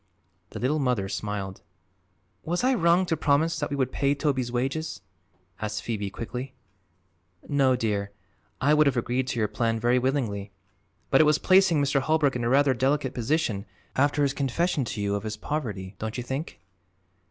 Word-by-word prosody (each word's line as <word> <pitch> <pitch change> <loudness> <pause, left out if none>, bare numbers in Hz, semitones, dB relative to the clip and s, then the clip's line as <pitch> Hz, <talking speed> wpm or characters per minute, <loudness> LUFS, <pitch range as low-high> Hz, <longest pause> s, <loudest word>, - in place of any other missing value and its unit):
The - - -8
Little 145 +5 +1
Mother 125 -8 0
smiled. 100 -1 -4 0.8
"Was 175 +5 -1
I 260 +1 +4
wrong 175 -3 +3
to 165 - 0
promise 155 +2 +1
that 145 - -2
we 140 - -2
would 130 -2 0
pay 140 0 +1
Toby's 135 -4 -1
wages?" 135 0 -2 0.6
asked 105 -1 -3
Phoebe 105 -4 -3
quickly. 125 +6 -6 0.9
"No, 135 -3 +3
dear; 105 -4 -1 0.5
I 145 +3 +3
would 150 -1 +5
have 135 - +1
agreed 125 +2 0
to 125 - -3
your 110 -2 +2
plan 115 +1 -1
very 120 +2 +3
willingly. 120 -7 -1 0.6
But - - +6
it - - +5
was 150 0 +4
placing 185 -2 +4
Mr. 140 0 +2
Holbrook 150 -2 +2
in 120 - -2
a 115 - +1
rather 140 +1 +4
delicate 135 +1 0
position, 120 -5 -1 0.3
after 145 +2 +2
his 140 -1 +1
confession 145 +2 0
to 110 - -5
you 100 0 0
of 100 - -1
his 110 0 -5
poverty, 105 -9 -4
don't 110 +2 -4
you 125 - -3
think?" 135 +6 -5
130 Hz, 175 wpm, -26 LUFS, 115-150 Hz, 0.9 s, But